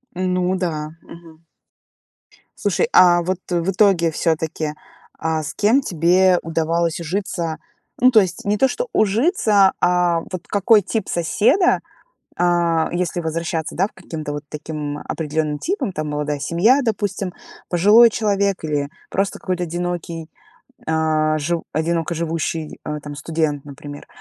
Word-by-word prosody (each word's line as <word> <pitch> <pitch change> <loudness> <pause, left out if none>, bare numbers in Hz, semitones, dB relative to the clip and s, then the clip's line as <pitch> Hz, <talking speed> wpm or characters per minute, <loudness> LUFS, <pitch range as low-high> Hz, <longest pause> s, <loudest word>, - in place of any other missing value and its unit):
Ну 185 0 0
да. 160 -3 -3
Мгм. 165 -1 -14 1.2
Слушай, 470 - +1
а 175 -1 +6
вот 185 +1 -2
в 175 +1 0
итоге 185 -4 +3
всё-таки, 160 -1 -1 0.4
а 160 -1 -2
с 145 - -6
кем 225 +7 +3
тебе 180 - +3
удавалось 165 +1 0
ужиться? 170 -1 -3 0.4
Ну, 255 +1 +6
то 225 - +6
есть 185 -4 -3
не 205 +1 +1
то, 265 - +4
что 485 - -3
ужиться, 215 - +3
а 175 -2 +2
вот 185 - -6
какой 205 +1 +4
тип 215 +2 -3
соседа, 215 - +2 0.6
а, 170 -2 +2
если 175 0 -1
возвращаться, 165 0 -3
да, 190 +3 +2
в - - -26
к - - -58
каким-то 160 -5 -6
вот 145 0 -5
таким 150 -1 -5
определенным 155 -1 -2
типам, 365 - -2
там, 155 -3 -4
молодая 150 0 -2
семья, 200 - +3
допустим, 205 -5 -2 0.3
пожилой 210 +7 +6
человек 200 -4 0
или 145 -2 -1 0.2
просто 195 +1 -1
какой-то 180 -1 -2
одинокий, 170 -1 -4 0.6
э, 155 -1 +1
жив 165 +3 -1
одиноко 165 +2 -1
живущий, 165 -1 -3
э, 150 0 -3
там, 145 0 -8
студент, 150 -1 -2
например. 145 0 -10
170 Hz, 140 wpm, -20 LUFS, 155-190 Hz, 1.2 s, а